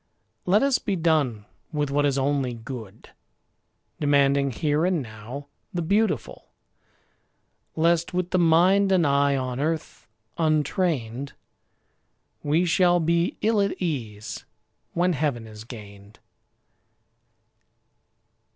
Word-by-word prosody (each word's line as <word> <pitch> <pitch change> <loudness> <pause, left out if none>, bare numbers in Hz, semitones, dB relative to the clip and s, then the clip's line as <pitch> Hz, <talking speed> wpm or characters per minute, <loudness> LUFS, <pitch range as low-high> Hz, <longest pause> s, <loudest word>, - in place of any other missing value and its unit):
Let 205 +6 +4
us 275 -2 +2
be 200 - -2
done 150 - +1 0.3
with 150 -3 -1
what 145 +1 +2
is 140 -1 0
only 135 -2 0
good, 115 -3 -9 0.9
Demanding 140 -1 +3
here 150 +5 0
and 180 -1 +2
now 120 +3 -8 0.3
the 175 - -1
beautiful; 210 +6 0 1.3
Lest, 170 +1 +2
with 180 0 -2
the 185 - +2
mind 180 +4 +4
and 180 -3 +4
eye 140 0 +3
on 130 -1 -3
earth 155 -5 -3 0.3
untrained, 150 - 0 1.1
We 155 +5 +2
shall 175 0 +3
be 170 +1 +1
ill 215 -1 +2
at 200 -1 -1
ease 115 - -4 0.5
when 180 +1 +2
heaven 140 -6 -1
is 110 0 -11
gained. 105 -3 -12
145 Hz, 110 wpm, -25 LUFS, 125-175 Hz, 1.3 s, Let